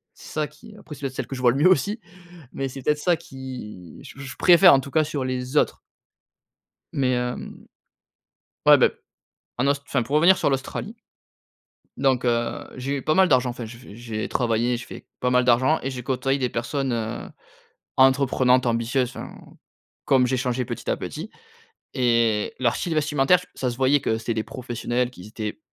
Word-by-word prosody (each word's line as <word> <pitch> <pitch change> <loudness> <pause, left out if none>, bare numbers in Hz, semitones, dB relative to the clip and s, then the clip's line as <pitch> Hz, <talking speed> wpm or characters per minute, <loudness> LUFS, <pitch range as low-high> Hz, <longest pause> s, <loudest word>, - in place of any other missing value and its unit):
c'est - - -13
ça 155 -1 -1
qui, 210 +9 -16
après 155 - -10
c'est 135 - -15
peut 140 - -1
être 130 - -10
celles - - -4
que 135 - -5
je 125 - -6
vois 125 -1 +5
le 130 - -2
mieux 160 +6 +5
aussi 200 - +2 0.5
mais 135 0 -3
c'est 135 +1 -8
peut-être 150 +2 +1
ça 175 +1 +2
qui 130 - -9
je - - -12
je 135 -1 -8
préfère 180 -1 +7
en 135 - +5
tout 140 - -10
cas 155 +3 +3
sur 145 -4 -3
les 130 +2 -3
autres - - +2 1.2
mais 130 -2 +1
hem, 125 0 -5 1.0
ouais - - +8
beh, - - +4 0.7
en 125 - +1
Aus 140 0 +1
enfin 125 - 0
pour 140 +5 -1
revenir 175 +5 +6
sur - - +1
l'Australie 135 -1 -4 1.0
donc 130 -2 +1
heu, 120 -1 -1
j'ai 135 +2 -2
eu - - -5
pas 155 - +2
mal 190 +2 +5
d'argent 130 -2 +3
enfin, 120 -1 -7
j'ai 115 +2 -10
fait 120 -4 -13
j'ai 115 -2 -5
travaillé, 120 0 0
j'ai 120 - -8
fait - - -11
pas 125 - 0
mal 125 0 +3
d'argent 130 +6 +3
et 135 - -2
j'ai 125 -1 -5
côtoyé 135 +2 0
des 125 -2 0
personnes, 130 +3 -2
heu, 115 -1 -3 0.7
entreprenantes 130 -1 +4
ambitieuses 120 +2 0
enfin, - - -8 0.7
comme 130 -2 +4
j'ai 130 - 0
changé 125 0 -1
petit - - -6
à - - +1
petit - - -6 0.6
et 115 -4 +1
leur 120 -2 +2
style 170 -2 -2
vestimentaire 150 +2 +3
f 180 - -13
ça 130 - -1
se 120 - -6
voyait 135 +2 +3
que 110 - 0
c'était 115 +1 -3
des 110 -1 -2
professionnels 125 -1 -3
qui 90 -3 -12
étaient, 110 +6 -6
130 Hz, 200 wpm, -24 LUFS, 120-140 Hz, 1.2 s, ouais